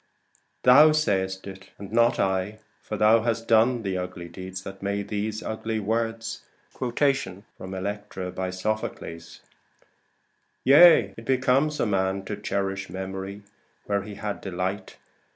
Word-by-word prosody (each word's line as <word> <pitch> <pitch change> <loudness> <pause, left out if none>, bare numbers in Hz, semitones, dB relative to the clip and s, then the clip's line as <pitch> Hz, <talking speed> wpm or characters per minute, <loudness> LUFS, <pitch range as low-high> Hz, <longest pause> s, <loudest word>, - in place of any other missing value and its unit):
Thou 150 +5 +8
sayst 95 -10 0
it, 95 0 -10
and 100 0 -9
not 115 +1 +3
I; 95 +2 0 0.2
for - - -5
thou 110 +1 +5
hast 115 0 -2
done 115 +1 +3
The 95 -2 -2
ugly 90 -1 -6
deed 95 +2 -9
that 95 0 -9
made 100 0 -2
these 105 +1 -3
ugly 110 0 -3
words. 115 +1 -2 0.4
SOPHOCLES: 135 0 +1 0.3
Electra. 95 -1 -5 2.1
Yea, 140 - +7
it 115 - -11
becomes 135 +4 +2
a - - +2
man 95 -2 0
To 105 - -4
cherish 95 -1 -3
memory, 95 +1 -6 0.4
where 100 -1 0
he 100 +1 -9
had 105 -1 -4
delight. 95 +1 -4
100 Hz, 125 wpm, -25 LUFS, 95-115 Hz, 2.1 s, Thou